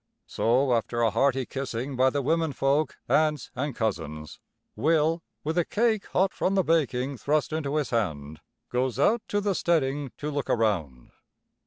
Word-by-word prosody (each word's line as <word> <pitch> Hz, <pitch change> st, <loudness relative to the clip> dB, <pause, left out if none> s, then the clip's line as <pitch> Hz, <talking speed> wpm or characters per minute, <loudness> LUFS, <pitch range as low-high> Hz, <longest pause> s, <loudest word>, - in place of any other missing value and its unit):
So, 125 Hz, +3 st, +2 dB
after 120 Hz, 0 st, 0 dB
a 115 Hz, -, +3 dB
hearty 130 Hz, +3 st, +2 dB
kissing 135 Hz, 0 st, -4 dB
by 130 Hz, +1 st, +4 dB
the 140 Hz, +1 st, -2 dB
womenfolk, 150 Hz, -1 st, +1 dB
aunts 155 Hz, -3 st, +1 dB
and 140 Hz, 0 st, -3 dB
cousins, 80 Hz, -8 st, -3 dB, 0.4 s
Will, 160 Hz, +2 st, +2 dB, 0.2 s
with 160 Hz, +3 st, 0 dB
a -, -, +3 dB
cake 220 Hz, +2 st, 0 dB
hot 190 Hz, +1 st, +1 dB
from 195 Hz, -, 0 dB
the 190 Hz, -, +3 dB
baking 140 Hz, -5 st, 0 dB
thrust 150 Hz, +4 st, 0 dB
into 150 Hz, -2 st, -2 dB
his 150 Hz, -4 st, -1 dB
hand, 80 Hz, -10 st, -2 dB, 0.3 s
goes 125 Hz, -1 st, 0 dB
out 215 Hz, -, +3 dB
to 205 Hz, -, 0 dB
the 205 Hz, -1 st, 0 dB
steading 145 Hz, -6 st, 0 dB
to 150 Hz, +1 st, -4 dB
look 145 Hz, -2 st, -3 dB
around. 85 Hz, -, -1 dB
140 Hz, 160 wpm, -27 LUFS, 120-155 Hz, 0.4 s, by